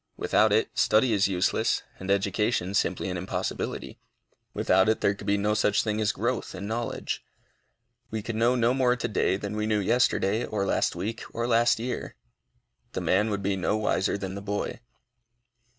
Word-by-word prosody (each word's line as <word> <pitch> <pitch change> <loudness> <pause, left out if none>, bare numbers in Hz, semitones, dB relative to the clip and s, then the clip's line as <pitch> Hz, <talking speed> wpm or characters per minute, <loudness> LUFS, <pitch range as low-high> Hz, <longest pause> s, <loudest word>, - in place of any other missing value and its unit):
Without - - +3
it, - - +2
study 110 +2 +3
is 100 -1 +3
useless, 90 -2 +1 0.2
and 95 - -7
education 100 0 +1
simply 100 - 0
an 90 -1 -3
impossibility. 90 +2 -4 0.5
Without 95 +3 +3
it, 110 - +2
there 100 - +3
could 100 0 -10
be 100 0 +3
no 105 +1 +1
such 105 -1 +2
thing 110 0 -1
as 110 0 +2
growth 120 +4 -2
in 95 +2 -6
knowledge. 115 +2 -3 0.9
We 110 -2 -4
could 115 - -4
know 120 +3 +3
no 120 0 +3
more 125 -2 +3
to 125 - -2
day 100 -2 +1
than 100 +1 -5
we 105 0 -1
knew 110 -1 +2
yesterday, 110 0 +2
or 105 -4 -2
last 95 - +1
week, 110 +7 -4
or 115 - -1
last 120 0 +3
year. 120 +2 -4 0.8
The - - -2
man 105 +4 +2
would 100 -1 -2
be 100 0 +1
no 95 +3 0
wiser 105 -2 0
than 95 -1 -5
the 100 - -6
boy. 100 +2 -3
105 Hz, 180 wpm, -27 LUFS, 100-115 Hz, 0.9 s, Without